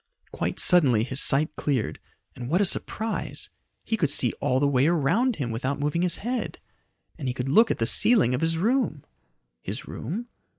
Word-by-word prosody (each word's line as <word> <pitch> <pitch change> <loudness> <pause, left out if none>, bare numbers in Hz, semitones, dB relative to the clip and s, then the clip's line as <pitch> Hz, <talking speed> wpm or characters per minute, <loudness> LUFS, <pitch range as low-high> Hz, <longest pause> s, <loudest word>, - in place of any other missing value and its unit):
Quite - - -4
suddenly 135 - +4
his 130 +3 +2
sight 150 +3 +3
cleared, 135 -7 -2 0.4
and 125 0 -7
what 175 +5 +1
a 205 - +3
surprise! 220 +3 -2 0.3
He 225 - -2
could 155 -9 0
see 125 -4 +2
all 130 - +1
the 145 - +2
way 135 0 +2
around 175 - +1
him 125 -8 -4
without 130 +5 -3
moving 150 +4 -1
his 180 -1 +1
head! 245 0 -3 0.6
And 135 - -4
he 125 - -3
could 130 0 -4
look 220 +10 +4
at - - -1
the 115 - -1
ceiling 205 - +4
of 125 - -2
his 165 0 0
room! 220 - -1 0.6
His - - -5
room? 215 +10 -6
150 Hz, 185 wpm, -25 LUFS, 130-200 Hz, 0.6 s, suddenly